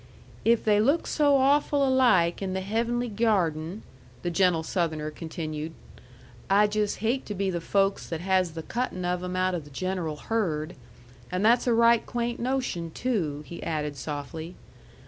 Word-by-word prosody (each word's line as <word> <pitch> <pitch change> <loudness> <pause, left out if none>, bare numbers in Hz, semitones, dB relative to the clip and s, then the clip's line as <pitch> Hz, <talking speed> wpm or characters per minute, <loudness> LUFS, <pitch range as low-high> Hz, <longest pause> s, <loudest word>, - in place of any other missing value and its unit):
"If 230 +1 +3
they 210 -1 +4
look 285 +9 +2
so 290 -2 +3
awful 280 +1 +3
alike 240 -11 +3
in 190 -1 -2
the 190 - -2
heavenly 235 +5 -1
gyarden," 195 -5 0 0.4
the 175 - -1
gentle 170 -2 +2
Southerner 160 -3 -1
continued, 160 -1 -5 0.8
"I'd 205 +2 +4
just 210 -1 0
hate 250 +4 +1
to 210 - -4
be 195 0 0
the 170 -2 -3
folks 195 +3 +1
that 165 - -3
has 185 -2 +1
the 160 0 -6
cuttin' 230 -6 -3
of 180 0 -1
'em 180 0 -4
out 185 0 +1
o' 175 - -1
the 145 -2 -13
general 175 +1 -3
herd. 165 -4 -2 0.6
And 185 +3 0
that's 235 +3 +4
a 240 - +4
right 235 0 +5
quaint 240 0 -3
notion 245 -10 -2
too," 160 - -2
he 170 - -8
added 150 -2 -2
softly. 155 +5 -6
190 Hz, 165 wpm, -27 LUFS, 165-230 Hz, 0.8 s, right